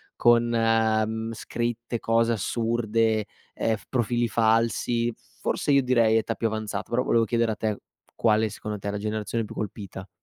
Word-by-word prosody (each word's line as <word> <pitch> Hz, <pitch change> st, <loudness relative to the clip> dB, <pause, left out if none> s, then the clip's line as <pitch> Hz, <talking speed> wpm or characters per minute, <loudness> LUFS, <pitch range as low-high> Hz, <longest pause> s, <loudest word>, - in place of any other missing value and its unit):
con, 120 Hz, 0 st, +5 dB
mhmm, 110 Hz, -1 st, +1 dB
scritte, 120 Hz, +1 st, -3 dB
cose 115 Hz, +1 st, +2 dB
assurde, 115 Hz, -1 st, 0 dB, 0.3 s
ehm, 115 Hz, -, 0 dB
f 105 Hz, -, -13 dB
profili 120 Hz, -1 st, +1 dB
falsi, 115 Hz, +1 st, +1 dB, 0.3 s
forse -, -, -1 dB
io 140 Hz, -1 st, +5 dB
direi 115 Hz, -3 st, +3 dB
età 115 Hz, +1 st, 0 dB
più 115 Hz, -, -1 dB
avanzata, 110 Hz, -1 st, -4 dB
però 120 Hz, +2 st, +1 dB
volevo 115 Hz, -1 st, +3 dB
chiedere 115 Hz, +1 st, +1 dB
a 110 Hz, -, -2 dB
te 110 Hz, -1 st, -2 dB, 0.4 s
quale 110 Hz, 0 st, +2 dB
secondo 105 Hz, 0 st, -6 dB
te 100 Hz, -, -6 dB
è -, -, 0 dB
la 105 Hz, -, -3 dB
generazione 110 Hz, +2 st, -2 dB
più -, -, -9 dB
colpita. 100 Hz, -2 st, -6 dB
115 Hz, 165 wpm, -26 LUFS, 110-115 Hz, 0.4 s, con